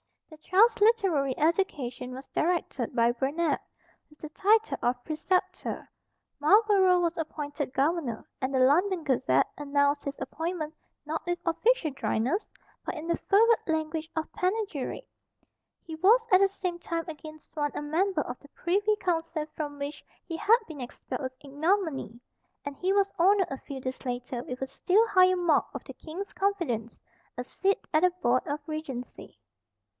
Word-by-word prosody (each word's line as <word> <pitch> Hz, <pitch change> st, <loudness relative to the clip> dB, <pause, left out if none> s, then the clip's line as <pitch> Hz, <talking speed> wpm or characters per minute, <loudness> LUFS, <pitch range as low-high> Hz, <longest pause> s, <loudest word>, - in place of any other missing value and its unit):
The 310 Hz, -, -12 dB
child's 420 Hz, +8 st, +3 dB
literary 380 Hz, -, +3 dB
education 270 Hz, -7 st, 0 dB
was 265 Hz, +1 st, -9 dB
directed 315 Hz, -8 st, -1 dB
by 235 Hz, -1 st, +4 dB
Burnet, 285 Hz, +5 st, 0 dB, 0.5 s
with 300 Hz, -, -21 dB
the 310 Hz, -, -7 dB
title 430 Hz, +7 st, +2 dB
of 245 Hz, 0 st, 0 dB
Preceptor. 365 Hz, +5 st, -2 dB, 0.5 s
Marlborough 380 Hz, +2 st, +5 dB
was 340 Hz, 0 st, 0 dB
appointed 290 Hz, -3 st, -4 dB
Governor; 275 Hz, -4 st, 0 dB
and 260 Hz, +1 st, -1 dB
the 260 Hz, -, +4 dB
London 350 Hz, +6 st, +3 dB
Gazette 235 Hz, -, +2 dB
announced 285 Hz, 0 st, +1 dB
his 280 Hz, 0 st, -4 dB
appointment, 320 Hz, -1 st, -4 dB, 0.3 s
not 315 Hz, +1 st, -3 dB
with 350 Hz, 0 st, 0 dB
official 350 Hz, +1 st, +2 dB
dryness, 265 Hz, -, -1 dB, 0.4 s
but -, -, -4 dB
in 310 Hz, 0 st, -6 dB
the 335 Hz, -, +1 dB
fervid 450 Hz, +3 st, +4 dB
language 315 Hz, 0 st, -2 dB
of 320 Hz, -1 st, -3 dB
panegyric. 380 Hz, -, -2 dB, 0.8 s
He 325 Hz, -, -8 dB
was 430 Hz, +9 st, +5 dB
at 370 Hz, -, +8 dB
the 395 Hz, -, +6 dB
same 365 Hz, -3 st, -4 dB
time 335 Hz, -1 st, -3 dB
again 310 Hz, -1 st, -8 dB
sworn 295 Hz, -1 st, -4 dB
a -, -, -2 dB
member 325 Hz, +3 st, +1 dB
of 245 Hz, -3 st, -6 dB
the 285 Hz, -, -17 dB
Privy 410 Hz, +7 st, +1 dB
Council 330 Hz, -5 st, -1 dB
from 290 Hz, -2 st, -4 dB
which 285 Hz, +1 st, -5 dB, 0.2 s
he 330 Hz, -, -5 dB
had 450 Hz, +6 st, +5 dB
been 300 Hz, -4 st, -8 dB
expelled 245 Hz, -, -6 dB
with 260 Hz, -1 st, -4 dB
ignominy; 290 Hz, -, -1 dB, 0.5 s
and 285 Hz, 0 st, -5 dB
he 370 Hz, +1 st, 0 dB
was 395 Hz, 0 st, +3 dB
honoured 380 Hz, 0 st, +4 dB
a 270 Hz, -, -4 dB
few 275 Hz, -2 st, -7 dB
days 255 Hz, 0 st, -5 dB
later 245 Hz, -1 st, -4 dB
with 250 Hz, +1 st, -6 dB
a -, -, -3 dB
still 400 Hz, +10 st, +3 dB
higher 370 Hz, -1 st, +5 dB
mark 345 Hz, -4 st, +2 dB
of -, -, -5 dB
the -, -, -9 dB
King's 360 Hz, +6 st, -7 dB
confidence, 330 Hz, -, -1 dB, 0.4 s
a 245 Hz, -, -2 dB
seat 390 Hz, +9 st, -1 dB
at 310 Hz, -, +4 dB
the 365 Hz, -, +5 dB
board 245 Hz, +2 st, +2 dB
of 290 Hz, +1 st, -2 dB
Regency. 310 Hz, -6 st, -6 dB
315 Hz, 160 wpm, -28 LUFS, 280-370 Hz, 0.8 s, at